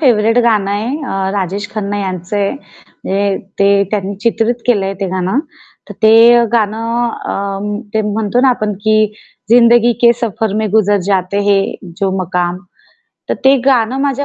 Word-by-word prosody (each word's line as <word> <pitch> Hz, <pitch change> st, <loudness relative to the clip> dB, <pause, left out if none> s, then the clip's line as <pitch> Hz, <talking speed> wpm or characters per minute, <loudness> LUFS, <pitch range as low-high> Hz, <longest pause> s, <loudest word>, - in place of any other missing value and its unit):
Favourite 230 Hz, -4 st, +3 dB
गाणं 210 Hz, -4 st, +1 dB
आहे, 210 Hz, +3 st, -2 dB, 0.2 s
अ, 195 Hz, -5 st, -2 dB
राजेश 200 Hz, +2 st, -3 dB
खन्ना 205 Hz, -1 st, -3 dB
यांचं 185 Hz, 0 st, -4 dB
आहे. 200 Hz, -1 st, 0 dB, 0.5 s
म्हणजे 195 Hz, 0 st, 0 dB, 0.2 s
ते 200 Hz, 0 st, +3 dB
त्यांनी 200 Hz, -1 st, -2 dB
चित्रित 230 Hz, 0 st, +1 dB
केलंय 200 Hz, -5 st, +1 dB
ते 195 Hz, -, -1 dB
गाणं. 185 Hz, +5 st, -1 dB, 0.5 s
तर -, -, -9 dB
ते 230 Hz, +2 st, +6 dB
गाणं 230 Hz, +2 st, 0 dB
अ, -, -, -6 dB, 0.6 s
ते 220 Hz, -, +1 dB
म्हणतो 220 Hz, +2 st, 0 dB
ना 265 Hz, -, +4 dB
आपण, 215 Hz, -4 st, 0 dB
की 215 Hz, -1 st, +2 dB, 0.4 s
जिंदगी 240 Hz, 0 st, +5 dB
के 235 Hz, 0 st, +7 dB
सफर 220 Hz, -2 st, -2 dB
में 220 Hz, 0 st, 0 dB
गुजर 205 Hz, -1 st, +3 dB
जाते 195 Hz, 0 st, 0 dB
है 200 Hz, -1 st, +4 dB, 0.4 s
जो 195 Hz, -1 st, +1 dB
मकाम 180 Hz, 0 st, -2 dB, 0.7 s
तर -, -, 0 dB
ते 270 Hz, +1 st, +6 dB
गाणं 255 Hz, -2 st, +2 dB
माझ्या 280 Hz, 0 st, -1 dB
215 Hz, 155 wpm, -14 LUFS, 195-235 Hz, 0.7 s, के